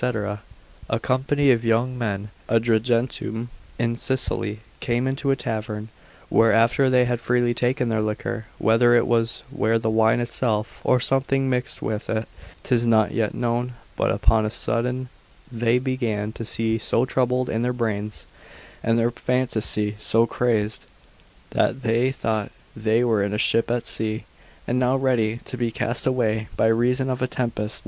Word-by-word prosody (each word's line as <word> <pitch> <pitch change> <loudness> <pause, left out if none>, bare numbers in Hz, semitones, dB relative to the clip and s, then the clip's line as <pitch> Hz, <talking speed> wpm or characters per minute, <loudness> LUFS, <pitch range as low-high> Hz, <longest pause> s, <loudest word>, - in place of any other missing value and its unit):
A 110 - +1
company 135 +3 +2
of 120 -2 +1
young 115 +3 +1
men 105 -4 -3 0.2
at 115 0 +3
Agrigentum 115 0 0 0.3
in 115 0 0
Sicily, 115 -4 -1 0.2
came 120 +1 0
into 135 +1 -1
a 135 - +4
tavern; 110 -3 -4 0.4
where 115 0 +4
after 115 +5 +3
they 125 -1 +4
had 120 -1 -1
freely 120 0 +2
taken 125 0 0
their 110 -1 +1
liquor, 110 +1 -3
whether 120 +3 +4
it 120 - +4
were 115 0 0
the 110 0 -1
wine 110 +1 +3
itself, 115 -2 -1
or 125 - +3
something 135 +1 +1
mixed 125 0 -2
with 110 -1 -3
it 110 0 -1 0.4
'tis 120 -1 +1
not 110 -2 +4
yet 110 -3 -1
known, 120 +1 -1 0.2
but - - +1
upon 110 -1 +3
a 105 - 0
sudden 125 +3 -1 0.4
they 120 0 +2
began 120 -5 -2
to 115 +1 -7
be 115 0 0
so 120 +2 +1
troubled 125 -1 0
in 110 - -1
their 125 +1 +1
brains, 110 -3 -3 0.6
and 115 0 +1
their 115 +1 +2
phantasy 110 -4 0
so 115 +1 +3
crazed, 110 -3 -1 0.6
that 135 - 0
they 115 +3 +2
thought 110 -5 -2 0.2
they 110 +2 +1
were 115 -4 +2
in 100 +1 -1
a - - -1
ship 115 +2 +2
at 120 0 -1
sea, 110 0 -2 0.4
and 125 +1 +1
now 125 +1 +2
ready 120 -5 +1
to - - -6
be 120 -2 -1
cast 115 +2 -2
away 110 -4 0
by - - +3
reason 125 +4 +2
of 130 -1 -2
a 130 - +1
tempest. 115 -4 -2
115 Hz, 165 wpm, -23 LUFS, 110-125 Hz, 0.6 s, a